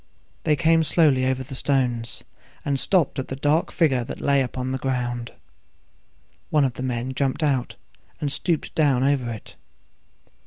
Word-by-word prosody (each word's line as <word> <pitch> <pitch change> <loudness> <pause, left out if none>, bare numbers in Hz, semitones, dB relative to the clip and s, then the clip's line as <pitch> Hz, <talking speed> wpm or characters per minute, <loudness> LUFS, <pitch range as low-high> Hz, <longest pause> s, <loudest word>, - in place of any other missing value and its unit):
They 150 - +4
came 165 +1 +3
slowly 145 -5 +3
over 130 0 0
the 135 +2 -10
stones, 125 -4 0 0.4
and 140 -1 0
stopped 175 -6 +2
at 130 - -3
the 135 - -4
dark 145 +4 +1
figure 135 -7 +2
that - - -7
lay 140 -1 +3
upon 130 0 -3
the 130 - -2
ground. 120 -2 -2 1.2
One 150 -2 +3
of 130 - -1
the 125 - -7
men 125 0 -2
jumped 135 +3 -1
out, 135 -4 0 0.4
and 145 -2 -1
stooped 165 +2 -1
down 140 -5 +3
over 135 -3 +1
it. 110 - -9
135 Hz, 160 wpm, -24 LUFS, 125-145 Hz, 1.2 s, They